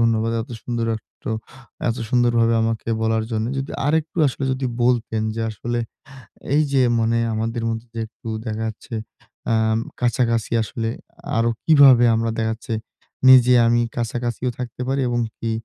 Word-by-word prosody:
ধন্যবাদ। 115 0 +2
এত - - -13
সুন্দর 120 -2 -2
একটো 110 - -10 0.6
এত 115 - 0
সুন্দরভাবে 120 -2 +3
আমাকে 115 0 -2
বলার 110 0 +1
জন্য। 110 0 -1
যদি 135 - -4 0.2
আরেকটু 160 +2 0
আসলে 135 - -4
যদি 130 0 -2 0.2
বলতেন। 115 -3 +1
যে 115 - -3
আসলে 120 +3 -3 0.8
এই 155 - +5
যে 135 - +4 0.2
মানে 115 +1 +1 0.2
আমাদের 115 +1 -2
মধ্যে 115 +1 -5
যে 115 - -3
একটু 115 +1 -12 0.2
দেখা 110 0 -3
যাচ্ছে 110 +2 -8 0.6
আ - - +4 0.5
কাছাকাছি 115 -2 +1
আসলে 115 +1 -3 0.5
আরো 115 +1 +2 0.2
কিভাবে 140 -6 +7
আমরা 115 0 0
দেখাচ্ছে, 110 +1 -2 0.5
নিজে 125 -1 +8
আমি 120 0 +3 0.2
কাছাকাছিও 120 +1 -2
থাকতে 125 -1 -6
পারি 135 +1 +1
এবং 120 0 0 0.2
কি 115 - -3
115 Hz, 150 wpm, -22 LUFS, 115-125 Hz, 0.8 s, নিজে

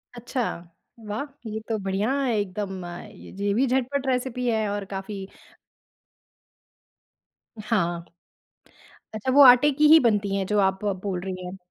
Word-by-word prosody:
अच्छा, 245 +2 -4 0.7
वाह! 210 +6 -3 0.3
ये 215 +1 -4
तो 225 - 0
बढ़िया 195 +5 -1
है 255 -3 0
एकदम 190 -1 -4
अ, 175 +3 -8
ज 200 -1 -12
ये 200 0 +1
भी 250 +6 +2
झटपट 265 +2 -1
रेसिपी 250 -1 -1
है 220 -2 +1
और 205 0 -3
काफ़ी 195 0 -6 2.3
हाँ। 175 -6 -1 1.1
अच्छा 215 +4 -2
वो 285 +2 +6
आटे 250 +3 +8
की 300 +2 +3
ही 320 +2 +9
बनती 205 -6 +1
हैं, 195 -1 -1
जो 210 +1 +1
आप 190 0 +1
ब 205 -1 +1
बोल 190 -3 -3
रही 185 -1 -6
हैं। 180 +2 -7
210 Hz, 155 wpm, -25 LUFS, 195-250 Hz, 2.3 s, ही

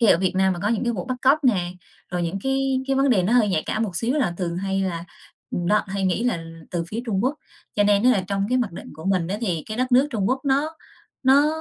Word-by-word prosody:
khi 230 - +4
ở 185 - +6
Việt 185 0 +1
Nam 190 0 +3
mà 175 - -5
có 205 - +1
những 230 +1 0
cái 240 - +1
vụ 180 -6 -4
bắt 255 - -3
cóc 280 +3 +4
nè, 180 -8 +2 0.4
rồi 180 0 -1
những 170 +3 -2
cái 270 0 +1
cái 270 -1 +1
vấn 275 0 +3
đề 200 -7 +4
nó 190 +6 +1
hơi 240 -4 +4
nhạy 165 -5 +1
cảm 220 - -1
một 190 -6 -3
xíu 240 +4 0
là 255 - 0
thường 170 -2 -2
hay 195 +1 -1
là 170 -3 -3 0.5
ừm, 175 - -2
đó 210 +3 +3
hay 195 0 -2
nghĩ 185 +5 0
là 175 -10 0 0.3
từ 170 -1 -2
phía 220 +5 -3
Trung 200 -2 0
Quốc. 265 +3 +1 0.4
Cho 205 - +4
nên 205 0 +4
á 250 - +6
là 200 -7 +2
trong 200 0 0
cái 255 +1 +2
mặc 235 -8 -1
định - - -9
của 160 - -11
mình 185 -3 +1
á 200 +3 -2
thì 180 -9 -1
cái 215 - -5
đất 255 +1 -1
nước 260 +3 +6
Trung 210 -6 0
Quốc 260 +1 0
nó 285 +4 +1 0.5
nó 275 +2 +5
210 Hz, 290 wpm, -23 LUFS, 185-255 Hz, 0.5 s, ở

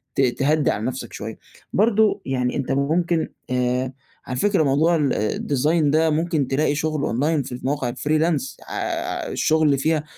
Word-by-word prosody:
ت - - +2
تهدّي 140 +4 +2
على 105 - -3
نفسك 125 -2 -4
شويّة، 110 +1 -6 0.4
برضو 215 -1 +3
يعني 125 -2 -1
أنت 135 -1 -2
ممكن 160 +4 +1 0.2
آآ، 125 +1 0 0.3
على 125 0 -3
فكرة 200 -2 +2
موضوع 155 +5 +3
ال 145 -4 +1
ال 105 0 -2
design 150 +4 +2
ده 160 +1 +3
ممكن 155 -2 0
تلاقي 145 +2 +1
شغل 155 -1 -1
أونلاين 145 +4 +1
في 130 - -9
المواقع 130 +1 -2
ال 120 - -7
freelance 155 -2 0
ع - - -6 0.6
الشغل 155 0 +2
اللي 140 -1 +3
فيها 155 +2 +1
145 Hz, 170 wpm, -22 LUFS, 130-160 Hz, 0.6 s, برضو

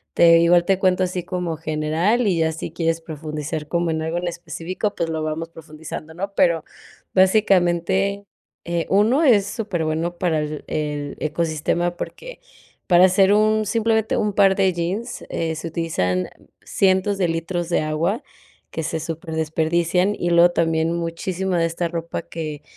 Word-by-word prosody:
te 165 -1 +7
igual 170 +1 +4
te 190 0 +2
cuento, 185 -1 +2
así 180 0 -2
como 175 -3 -3
general 160 +9 0
y 180 -5 +1
ya 160 0 +2
si 160 0 -6
quieres 165 0 -1
profundizar 155 -1 -5
como 170 0 0
en 160 0 -2
algo 160 +2 -2
en 175 - -2
específico, 175 +4 -4
pues 165 - -2
lo 160 -1 -2
vamos 155 +2 -3
profundizando, 160 0 -9
¿no? 195 +3 -4
Pero, 170 -4 +2 0.5
básicamente, 190 0 +2 0.4
eh, 170 -1 -2
1, 220 +10 +3
es 220 -9 +5
súper 205 -6 -3
bueno 165 +2 -2
para 170 -4 +1
el 150 0 -4
el 150 -2 -3
ecosistema 170 +2 -1
porque, - - -8 0.5
para 180 -1 +7
hacer 190 +1 +4
un, 215 +1 +3
simplemente, 220 +1 +1
un 210 -2 0
par 195 -1 +5
de 190 -1 +2
jeans 190 +8 -3
eh, 160 -1 -2
se 160 +2 -5
utilizan 120 - -1 0.4
cientos 190 +1 +2
de 180 -3 +1
litros 165 +1 -2
de 170 - +2
agua, 160 +8 -1 0.5
que 160 - -4
se 160 +1 -2
superdesperdician, 165 +3 0
y 175 - -2
luego 170 +1 +6
también 165 -1 +1
muchísima 175 +2 -2
de 165 0 +2
esta 170 +1 -2
ropa 170 0 -4
que, 155 -3 -6
170 Hz, 160 wpm, -22 LUFS, 160-190 Hz, 0.5 s, te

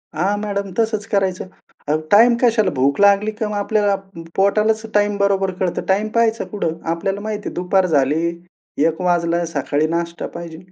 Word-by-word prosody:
हां, 195 +6 0
मॅडम 200 -2 -3
तसंच 220 -2 0
करायचं. 190 -2 -1 0.4
अ, 150 - +2 0.2
टाईम 235 +3 +6
कशाला? 225 -5 +3
भूक 135 +4 +1
लागली 200 +2 +4
का 215 0 -4
मग 210 - -4
आपल्याला 205 -1 +1 0.4
पोटालाच 215 +3 +2
टाईम 205 0 +2
बरोबर 195 -1 +1
कळतं. 180 -2 -1
टाईम 200 +3 +1
पहायचा 230 0 +2
कुठं? 165 -6 -2 0.2
आपल्याला 195 +4 -3
माहिती 215 -1 -4
आहे - - -12
दुपार 185 +1 +1
झाली, 155 +1 +1 0.5
1:00 160 +3 +1
वाजला 170 -1 +1
सकाळी 145 0 -1
नाष्टा 170 +1 -3
पाहिजे. 170 -2 -7
195 Hz, 160 wpm, -19 LUFS, 170-210 Hz, 0.5 s, टाईम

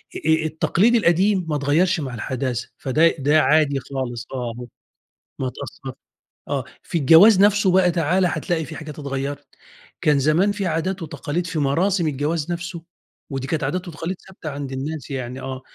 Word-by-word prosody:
آآ 160 0 +1
التقليد 185 +8 +2
القديم 185 -1 +3
ما 150 - 0
اتغيّرش 155 +5 +2
مع 130 -4 -4
الحداثة، 125 +1 -3
فده 155 +5 +3
ده 145 +3 +4
عادي 150 -2 +3
خالص 125 -3 -5
آه 120 -3 -3
هو 125 - -6 0.7
ما 130 - -2
اتأثّرش 130 0 -8 0.5
آه. - - -1 0.2
في - - -2
الجواز 165 +8 +7
نَفسه 205 -1 +4
بقى 180 -1 +4
تعال 170 +3 +1
هتلاقي 165 -1 -1
في 160 - -9
حاجات 150 0 -8
اتغيّرت. 140 0 -4 0.5
كان 150 -2 +3
زمان 160 +9 +3
في 205 -2 -3
عادات 175 +3 -2
وتقاليد 165 +2 -3
في 165 -2 -2
مراسم 170 +5 +1
الجواز 150 +3 -1
نَفسه 170 -1 -5 0.5
ودي 135 -1 -4
كانت 155 -2 -1
عادات 180 +6 -2
وتقاليد 170 +3 -5
ثابتة 180 -5 -8
عند 140 -1 -5
الناس 140 +2 -5
يعني 130 -1 -5
آه. 130 0 -5
155 Hz, 165 wpm, -22 LUFS, 135-175 Hz, 0.7 s, الجواز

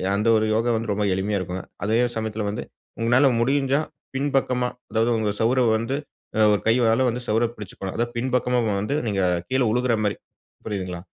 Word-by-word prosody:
அந்த 105 +3 0
ஒரு 110 - +1
யோகா 115 +2 +1
வந்து 110 -1 -3
ரொம்ப 105 +1 0
எளிமையா 100 +2 0
இருக்குங்க. 90 0 -5 0.2
அதே 110 +2 +2 0.2
சமயத்துல 110 -1 -2
வந்து 105 - -4 0.4
உங்களால 120 +5 +4
முடிஞ்சா 135 +2 +2 0.4
பின்பக்கமா, 135 -3 +1 0.2
அதாவது 115 +2 +2
உங்க 110 -1 0
சுவர 120 +4 +3 0.2
வந்து, 115 +4 -2 0.4
அ - - +2
ஒரு 105 - 0
கையால 115 +1 +3 0.3
சுவர 110 +2 +3
புடிச்சிக்கணும். 95 -2 -7
அதாது 120 0 -1
பின்பக்கமா 125 0 +1 0.2
வந்து 125 +8 -1
நீங்க 100 -2 0 0.3
கீழ 130 0 +1
விழுகிற 125 -1 +2
மாரி, 105 - 0 0.5
புரியுதுங்களா. 95 -4 -4
115 Hz, 160 wpm, -24 LUFS, 105-125 Hz, 0.5 s, உங்களால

